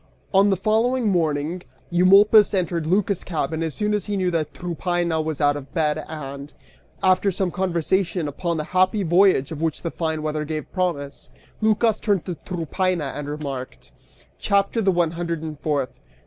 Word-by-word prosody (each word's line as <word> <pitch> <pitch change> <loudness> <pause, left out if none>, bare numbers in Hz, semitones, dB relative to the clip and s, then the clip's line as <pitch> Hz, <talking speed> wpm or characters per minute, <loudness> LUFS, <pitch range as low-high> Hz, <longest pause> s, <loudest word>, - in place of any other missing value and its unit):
(On 195 +1 +5
the 195 - +2
following 225 +4 +1
morning 160 -1 0 0.3
Eumolpus 200 +4 +6
entered 170 -3 -1
Lycas' 195 +1 +1
cabin 160 -1 -2
as 160 -3 -2
soon 210 0 0
as 210 -3 0
he 205 -1 -2
knew 185 -1 0
that 155 -3 -1
Tryphaena 175 -1 -1
was 155 -2 -3
out 145 -1 +3
of 140 -2 -8
bed 155 -1 0
and, 140 -2 -7 0.5
after 185 +1 +4
some 190 -1 -1
conversation 175 -2 0
upon 170 +4 -2
the 155 - -2
happy 185 +3 +3
voyage 175 -5 +3
of 155 -1 -5
which 160 -2 -2
the 170 - -2
fine 160 -2 -2
weather 155 0 -2
gave 155 0 -5
promise, 165 -7 -3 0.3
Lycas 215 0 +2
turned 200 -5 0
to 180 - -3
Tryphaena 175 -2 -2
and 145 0 -5
remarked:) 140 -4 -6 0.5
CHAPTER 200 +3 +1
THE 195 - +2
ONE 175 -2 +1
HUNDRED 170 -1 -3
AND 155 -2 -6
FOURTH. 145 -4 -1
170 Hz, 170 wpm, -23 LUFS, 155-190 Hz, 0.5 s, Eumolpus